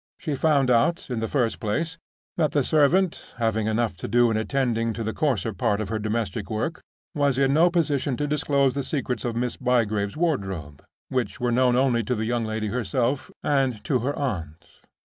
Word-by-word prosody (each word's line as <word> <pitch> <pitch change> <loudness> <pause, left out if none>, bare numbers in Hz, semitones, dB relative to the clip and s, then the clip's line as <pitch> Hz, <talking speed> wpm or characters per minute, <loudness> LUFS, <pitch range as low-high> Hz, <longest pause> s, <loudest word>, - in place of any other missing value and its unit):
She 155 - -3
found 140 -2 +2
out, 140 +5 +2
in 120 - -1
the 115 - -1
first 120 -4 0
place, 160 +10 -2 0.4
that 155 -3 +1
the 145 - +3
servant 160 +6 +2
(having 110 -2 0
enough 110 -2 0
to - - -5
do 120 -1 +4
in - - 0
attending 115 -1 0
to 115 - -4
the 110 0 -2
coarser 125 -7 0
part 105 +2 0
of 105 -3 -3
the 110 0 -1
domestic 110 0 -2
work) 110 +10 -2 0.3
was 145 -4 +1
in 135 0 +3
no 165 +4 +5
position 145 -6 0
to 145 - -1
disclose 140 -2 +1
the 140 - -1
secrets 130 -3 -3
of 120 -2 -2
Miss 120 +1 -2
Bygrave's 110 -4 0
wardrobe, 95 - -2 0.3
which 125 -3 -2
were 120 -1 0
known 125 0 +3
only 125 -2 +2
to 125 - 0
the 110 0 -2
young 120 0 0
lady 110 -1 -2
herself 125 +4 -1
and 135 -6 +1
to 130 -4 +1
her 135 +5 -2
aunt. 85 - -4
125 Hz, 195 wpm, -25 LUFS, 110-140 Hz, 0.4 s, no